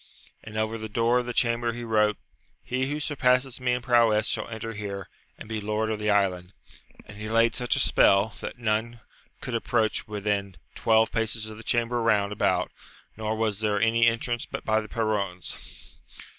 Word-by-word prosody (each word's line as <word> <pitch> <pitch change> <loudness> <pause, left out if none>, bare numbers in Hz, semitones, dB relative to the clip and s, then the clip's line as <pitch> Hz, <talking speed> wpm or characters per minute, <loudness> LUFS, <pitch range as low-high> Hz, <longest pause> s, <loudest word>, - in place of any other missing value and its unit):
And 110 0 -8
over 110 +1 -1
the 110 0 -6
door 115 +3 +2
of 125 - -4
the - - -2
chamber 115 0 +1
he 120 +1 -6
wrote: 105 -2 +2 0.5
He 130 +2 -1
who 150 +1 -2
surpasses 130 -3 +1
me 125 -1 +1
in 125 0 -2
prowess 115 -3 +4
shall - - -2
enter 115 0 -6
here, 100 -2 -5 0.3
and - - -10
be 110 -1 -3
lord 110 +1 -1
of 110 - -2
the 105 0 -1
island. 95 -3 +1 0.5
And 105 - -12
he 105 +1 -5
laid 115 0 +3
such 125 -1 +1
a - - 0
spell, 100 +2 +4
that - - -6
none 115 0 -1 0.4
could 125 - -5
approach 115 -1 0
within 100 -2 -2 0.2
twelve 110 0 +3
paces 115 -1 -1
of 110 0 -8
the 115 - -10
chamber 120 +1 0
round 105 -3 +2
about, 105 - +1 0.4
nor 110 0 -2
was 110 -2 -1
there 105 -2 +1
any 115 +1 +4
entrance 115 +1 -1
but - - -6
by 110 0 +2
the 110 - -10
perrons. 100 -5 -2
110 Hz, 185 wpm, -26 LUFS, 105-120 Hz, 0.5 s, prowess